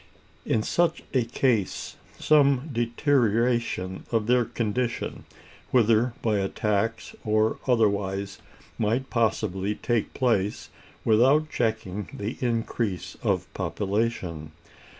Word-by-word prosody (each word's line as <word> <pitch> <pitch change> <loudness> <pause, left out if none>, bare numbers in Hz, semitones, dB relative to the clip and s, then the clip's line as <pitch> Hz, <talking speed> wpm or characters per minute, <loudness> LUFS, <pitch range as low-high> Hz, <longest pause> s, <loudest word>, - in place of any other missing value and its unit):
In 110 - +1
such 175 +7 +1
a 125 -4 +2
case, 115 -4 0 0.2
some 145 -1 +3
deterioration 115 -5 +1
of 115 -3 +1
their 125 +1 +3
condition, 120 +2 -2 0.4
whether 115 0 +3
by 110 -3 +2
a 95 0 -1
tax 110 +2 -1
or 110 0 +1
otherwise, 100 -4 +1 0.4
might 115 +5 0
possibly 105 -4 0
take 120 -1 -1
place 105 -6 0 0.4
without 135 +8 +4
checking 105 -4 -2
the 105 +4 -4
increase 115 -5 -2
of - - 0
population. 95 -7 -2
115 Hz, 100 wpm, -26 LUFS, 105-125 Hz, 0.4 s, without